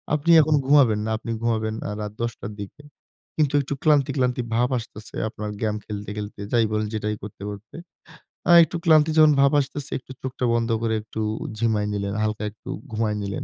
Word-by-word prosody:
আপনি 150 +3 +1
এখন 155 0 +2
ঘুমাবেন 130 -7 +5
না, - - -2
আপনি 115 - -6
ঘুমাবেন 110 -2 0
আ - - -3
রাত 105 -1 -5
১০ 115 0 0
টার 105 - -6
দিকে। 100 +9 -10 0.5
কিন্তু 150 -3 +2
একটু 140 - -4
ক্লান্তি, 145 -3 +4
ক্লান্তি 125 -1 +1
ভাব 120 +2 +2
আসতেছে 110 -2 -9
আপনার 105 -1 -6
গেম 110 -2 0
খেলতে, 105 -1 -6
খেলতে 105 -1 -6
যাই 115 -2 +3
বলেন, 105 0 0
যেটাই 105 0 -2
করতে, 105 -1 -9
করতে। 105 +1 -10 0.7
আ - - +7
একটু 165 +2 -3
ক্লান্তি 155 -1 +5
যখন 155 -1 +7
ভাব 140 0 +5
আসতেছে 145 +1 -4
একটু 130 - -14
চোখটা 130 -1 -3
বন্ধ 115 0 0
করে 115 -1 0
একটু 110 +1 -6 0.4
ঝিমাই 110 -2 +1
নিলেন, 100 -1 -2
হালকা 110 0 -2
একটু 105 - -14 0.2
ঘুমায় 110 -1 -1
নিলেন। 100 -1 -4
115 Hz, 190 wpm, -24 LUFS, 105-140 Hz, 0.7 s, আ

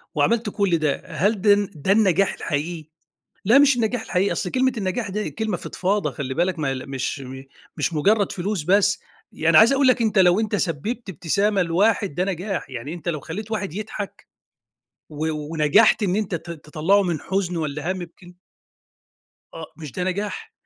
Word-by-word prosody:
وعمِلت 230 -2 +2
كل 195 -5 +1
ده، 150 -3 -1
هل 185 +5 0
ده 205 -1 +6
الن 205 -1 0
ده 155 +6 -1
النجاح 195 -2 +3
الحقيقي؟ 155 +1 -3 0.6
لا، 235 +7 +6
مش 285 -2 +5
النجاح 230 0 0
الحقيقي، 190 +2 0
أصل 180 - -3
كلمة 260 +3 +2
النجاح 200 +2 -2
ده 210 +2 -2
كلمة 220 -4 -2
فضْفاضة، 200 +4 -1
خلِّي 130 -3 -5
بالك، 175 +2 0
مل 135 -3 -2
مش 135 +1 -3
م 130 0 -8 0.3
مش 155 +3 -1
مجرَّد 200 +6 +2
فلوس 195 -1 -2
بس. 200 +4 +3 0.3
يعني 160 0 +2
عايِز 230 +5 +7
أقول 275 0 +3
لك 255 -2 +4
أنتَ 220 -2 +1
لو 185 +2 +5
أنتَ 210 -1 -1
سبَّبت 200 - -3
ابتسامة 195 +5 +1
لواحد 195 +1 +1
ده 180 +4 0
نجاح، 190 -2 -3
يعني 130 +6 -6
أنتَ 175 0 -7
لو 155 -3 -2
خلَّيت 205 +9 -7
واحد 200 -7 -3
يضحَك، 210 -1 -6 0.8
و 155 +1 -3
ونجَحت 155 +8 +3
إن 185 -1 +1
أنتَ 210 -4 -1
ت 170 +1 -7
تطلَّعه 165 +5 +1
من 170 -4 -1
حزَن 185 -2 -2
والّا 155 +2 -2
هَمّ، 185 -1 -4
يمكن 175 +1 -12 1.2
آه، 160 -1 -9
مش 155 -4 -8
ده 180 - -3
نجاح؟ 205 - -3
185 Hz, 175 wpm, -23 LUFS, 160-210 Hz, 1.2 s, عايِز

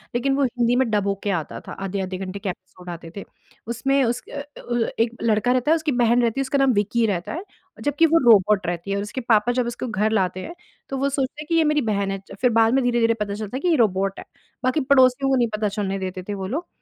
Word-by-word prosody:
लेकिन 270 +3 +1
वो 280 - +1
हिंदी 245 -1 +1
में 255 -2 +2
डब 205 -2 +1
हो 200 - +2
के 205 - -1
आता 165 -5 -3
था, - - -7
आधे-आधे 190 -1 -4
घंटे 190 +1 -6
के 195 - -3
एपिसोड 180 0 -10
आते 170 -1 -8
थे। - - -5 0.4
उसमें 270 +4 +1
उस 240 +1 0
अ - - -6
अ, 290 +1 -13
व 235 -1 +1
एक 230 +1 +1
लड़का 225 +1 +2
रहता 255 +4 +2
है, - - +6
उसकी 315 -2 -1
बहन 245 -1 +3
रहती 235 +2 0
है, - - +2
उसका 270 +1 0
नाम 270 -2 +3
विक्की 215 +3 +1
रहता 180 -4 -2
है, 340 - -5 0.4
जबकि 290 +3 +3
वो 330 +1 +4
रोबोट 205 -2 +4
रहती 175 +3 -3
है 200 - 0
और 200 - -2
उसके 235 +5 -5
पापा 235 0 +3
जब 245 -1 0
उसको 240 +1 -4
घर 215 0 0
लाते 185 -4 0
हैं 340 - -7 0.4
तो 270 - -3
वो 275 +1 +1
सोचते 275 +1 -2
हैं 305 - -9
कि 335 - +2
ये 330 - +4
मेरी 300 -1 +2
बहन 200 -3 -1
है। 195 - -3 0.2
फिर 250 - +4
बाद 225 +2 +4
में 270 - +3
धीरे-धीरे 235 -2 +2
पता 200 -1 -2
चलता 215 +3 -5
है - - -6
कि 360 - 0
ये 335 - +4
रोबोट 195 -4 +1
है। - - -9 0.4
बाकी 255 +4 +2
पड़ोसियों 260 0 +5
को 270 - +3
नहीं 240 -2 +2
पता 210 0 0
चलने 195 -1 -3
देते 185 -1 -5
थे - - -1
वो 190 -1 -4
लोग 315 - -4
235 Hz, 270 wpm, -23 LUFS, 200-265 Hz, 0.4 s, है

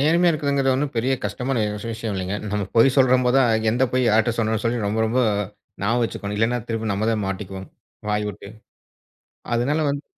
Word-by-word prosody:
நேர்மையா 170 +4 +4
இருக்கிறதுங்குறது 140 -3 +1
ஒன்னும் 140 +1 -1
பெரிய 125 +4 +1
கஷ்டமான 120 +3 -1 0.3
விஷயம் 110 -2 -4
இல்லீங்க. 95 +2 -2 0.2
நம்ம 105 -1 0
பொய் 125 +3 +5
சொல்றம் 130 -1 +4
போது 125 +2 +3
தான், 125 -3 +4 0.2
எந்த 125 - 0
பொய் 130 -1 +2
யார்ட்ட 110 +2 +3
சொல்லணும்னு 110 -1 0
சொல்லி 115 -1 0
ரொம்ப 110 +2 -1
ரொம்ப 120 +3 0 0.6
ஞாபகம் 115 +4 +1
வச்சிக்கனும். 105 -2 -4
இல்லனா 115 +3 +1
திரும்ப 110 -1 -2
நம்ம 110 +3 -1
தான் 105 -2 -1
மாட்டிக்குவோம். 95 0 -6 0.4
வாய் 105 0 0
விட்டு. 100 -1 -9 1.1
அதனால 140 +7 +1
வந்து 140 0 -3
115 Hz, 175 wpm, -22 LUFS, 105-130 Hz, 1.1 s, பொய்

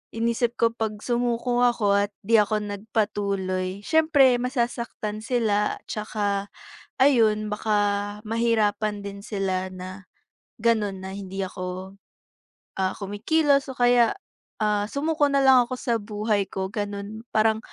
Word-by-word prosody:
inisip 235 +1 0
ko 230 0 +4
'pag 215 -2 -2
sumuko 240 0 0
ako 205 -4 +3
at - - -33
'di 225 +1 +5
ako 210 +1 0
nagpatuloy, 200 -2 -2
siyempre 290 -6 +4
masasaktan 235 -4 -3
sila. 220 -4 +1
'Tsaka, 205 -2 -2 0.5
ayun, 220 -6 +4
baka 205 -1 0
mahirapan 215 -2 +1
din 200 0 -7
sila 190 -3 -2
na, 185 +1 -9 0.6
gano'n, 210 -4 +1
na 190 - -6
hindi 195 -1 -5
ako, 185 +1 -6 0.8
ah, 185 0 +1
kumikilos 275 +9 +1
o 255 - -12
kaya, 245 -1 +4 0.5
ah, 210 -1 +1
sumuko 295 +1 +1
na 280 0 +2
lang 260 -2 +6
ako - - -3
sa 235 -2 0
buhay 210 -1 -1
ko, 190 0 -3
gano'n. 205 +1 -5
Parang, 220 0 +3
215 Hz, 125 wpm, -25 LUFS, 200-235 Hz, 0.8 s, lang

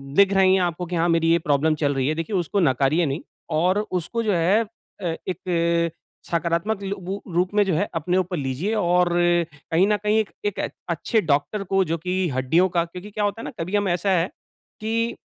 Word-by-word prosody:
दिख 200 0 +5
रही 190 -1 +5
है 190 - +2
आपको 175 0 -1
की 175 +1 -4
हाँ 170 +1 +2
मेरी 165 0 +3
ये 170 - +4
प्रॉब्लम 155 0 +2
चल 145 -2 0
रही 130 -1 0
है। 155 - 0
देखिए 165 +6 -3
उसको 185 +3 0
नकारिए 145 +2 +2
नहीं 140 +4 -2 0.3
और 180 +5 +2
उसको 185 +6 -2
जो 210 -3 +1
है, 180 +6 +3 0.4
अ, 170 -3 -1
एक 170 -2 0 0.4
सकारात्मक 170 +5 0
लू 200 +1 -3
वू 190 +3 -5
रूप 180 +3 +1
में 210 - +5
जो 190 - 0
है 200 +6 +1
अपने 175 +3 0
ऊपर 185 -1 -1
लीजिए 140 - -2
और 180 -3 +3 0.6
कहीं 175 +4 +4
न 210 - +3
कहीं 210 +1 +2
एक 215 - -1 0.2
एक 205 - -1 0.3
अच्छे 190 +6 +1
डॉक्टर 160 +7 0
को 195 0 +2
जो 165 +1 -1
कि 180 +3 -3 0.2
हड्डियों 135 +7 +2
का 170 -1 +1
क्योंकि 180 +4 -10
क्या 210 0 -2
होता 205 +3 -2
है - - -7
ना, - - -5
कभी 180 +5 -2
हम 205 -1 +1
ऐसा 175 +3 0
है 175 -1 +2 0.5
कि 230 +2 -1
180 Hz, 215 wpm, -23 LUFS, 165-195 Hz, 0.6 s, दिख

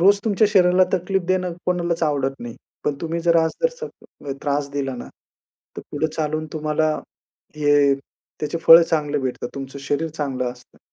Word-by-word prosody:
रोज 200 +3 +5
तुमच्या 215 0 +3
शरीराला 185 -2 +5
तकलीफ 190 +1 0
देणं 185 -1 +1
कोणालाच 170 -2 0
आवडत 135 -2 0
नाही. 120 -1 -7 0.3
पण 150 - +1
तुम्ही 165 0 -2
जर 170 0 +3
आज 160 -1 +3
जर 480 - -4
त्रास 145 0 -1
दिला 140 -2 -3
ना, - - -7 0.7
तर - - -4
पुढे 150 +2 0
चालून 155 0 -2
तुम्हाला 155 0 0 0.7
हे 145 -2 +4
त्याचे 145 +3 -7
फळं 165 +1 +9
चांगले 150 -3 0
भेटतात. 125 -2 -3
तुमचं 135 0 -7
शरीर 145 +3 -1
चांगलं 135 -5 -3
असतं, 125 0 -21
155 Hz, 160 wpm, -22 LUFS, 140-175 Hz, 0.7 s, फळं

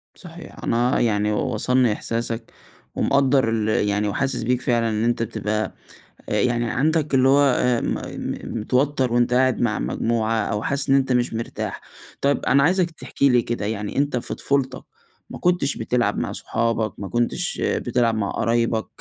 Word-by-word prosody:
صحيح، 170 -2 -12
أنا 120 +2 +1
يعني 105 -2 +1
وصلني 125 +2 +1
إحساسك، 115 +1 -4 0.4
ومقدر 135 -3 +2
ال 110 -1 0 0.2
يعني 105 +1 0
وحاسس 130 +3 -1
بيك 125 +1 0
فعلًا 115 -2 +1
إن 110 +1 -1
أنت 120 -1 +1
بتبقى 110 -1 -2 0.6
آآ، - - +1
يعني 120 -1 +1
عندك 155 +1 0
اللي 130 0 +4
هو 140 +1 +5
آآ 125 -3 +2
م - - -1
م 115 - -5
متوتر 130 +2 +1
وأنت 120 0 +2
قاعد 130 0 +2
مع 110 -3 +1
مجموعة 115 -1 -1
أو 105 0 -2
حاسس 140 0 -1
إن 135 - +5
أنت 135 -1 +2
مش 125 -1 +1
مرتاح. 115 +1 -4 0.4
طيب، 140 +1 +1
أنا 140 +1 +4
عايزك 180 +1 +2
تحكي 140 -3 0
لي 125 -1 +4
كده 120 -3 -3
يعني، 105 +1 -4
أنت 140 -2 +1
في - - -3
طفولتك 135 -2 -1 0.5
ما - - -8
كنتش 175 -6 +1
بتلعب 120 +1 0
مع - - -2
صحابك؟ 115 -1 -1
ما 100 -2 -5
كنتش 120 +4 -1
بتلعب 115 -2 +1
مع 100 -2 -1
قرايبك، 115 -1 0
120 Hz, 165 wpm, -22 LUFS, 115-135 Hz, 0.6 s, هو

